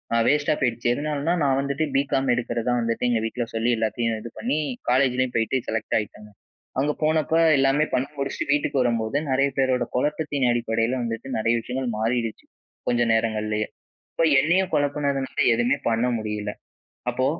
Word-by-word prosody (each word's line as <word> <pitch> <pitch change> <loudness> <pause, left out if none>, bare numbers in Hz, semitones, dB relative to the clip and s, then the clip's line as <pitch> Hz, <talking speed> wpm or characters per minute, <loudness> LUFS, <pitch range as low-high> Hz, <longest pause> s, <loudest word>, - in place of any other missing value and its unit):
அ - - +4
வேஸ்டா 145 +1 +3
போயிருச்சு. 120 -2 0
எதுனாலனா 150 +3 -1
நான் 135 -1 +2
வந்துட்டு 140 +2 -1
பிகாம் 135 -1 +1
எடுக்கிறதா 120 0 -1
வந்துட்டு 115 +1 -1
எங்க 120 -2 +2
வீட்ல 120 +1 -2
சொல்லி 115 +1 +1
எல்லாத்தையும் 115 0 -1
இது 120 - -7
பண்ணி, 130 +7 0 0.3
காலேஜ்லேயும் 130 -1 +2
போயிட்டு 115 +3 +1
செலக்ட் 110 0 -1
ஆயிட்டேங்க. 105 0 -8 0.5
அங்கே 145 +2 +1
போனப்ப 155 -1 +1 0.2
எல்லாமே 135 +3 +3
பண்ணி 130 +2 +1
முடிச்சுட்டு 140 0 -2
வீட்டுக்கு 145 -1 0
வரும்போதுதான் 120 +5 0
நிறைய 135 +2 +3
பேரோட 130 -2 +2
குழப்பத்தின் 145 0 0
அடிப்படையில 115 0 0
வந்துட்டு 115 +2 -4
நிறைய 115 +1 +2
விஷயங்கள் 125 +2 -3
மாறிருச்சு. 115 0 -1 0.4
கொஞ்ச 120 -1 +2
நேரங்கள்லேயே. 110 -1 0 0.5
இப்போ 165 - +2 0.2
என்னையும் 175 +6 +2
குழப்பினதுனால 145 -2 -1 0.2
எதுவுமே 120 +4 +2
பண்ண 115 +1 +1
முடியல. 105 -1 -3 0.6
அப்போ 130 +2 0
125 Hz, 150 wpm, -24 LUFS, 115-140 Hz, 0.6 s, அ